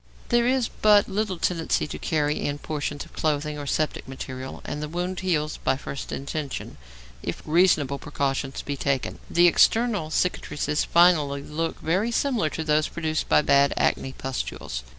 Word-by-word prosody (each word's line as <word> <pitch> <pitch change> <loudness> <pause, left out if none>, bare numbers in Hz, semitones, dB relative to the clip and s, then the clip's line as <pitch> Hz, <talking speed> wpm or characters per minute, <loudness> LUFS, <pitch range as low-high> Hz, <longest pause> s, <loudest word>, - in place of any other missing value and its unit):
There 240 0 +3
is 255 -2 +2
but 210 -1 +4
little 200 -1 -1
tendency 165 -1 0
to 150 - -7
carry 150 -2 0
in 145 0 -1
portions 145 -1 -4
of - - -19
clothing 150 -1 -1
or 145 - -6
septic 155 +2 -1
material, 130 0 -7
and 150 - -4
the 150 - -4
wound 180 +2 -3
heals 155 -5 0
by 130 - 0
first 135 0 -6
intention, 140 +1 -5 0.4
if - - -5
reasonable 155 -4 +3
precautions 135 -2 -2
be 140 - -3
taken. 135 -1 -1
The 175 +1 +4
external 210 0 +3
cicatrices 150 -3 0
finally 155 -5 +4
look 165 +3 -3
very 185 +8 +1
similar 235 - +1
to 160 - -4
those 155 0 +2
produced 160 -2 -2
by - - +5
bad 140 0 +4
acne 130 - 0
pustules. 130 - -4
155 Hz, 160 wpm, -25 LUFS, 140-180 Hz, 0.4 s, by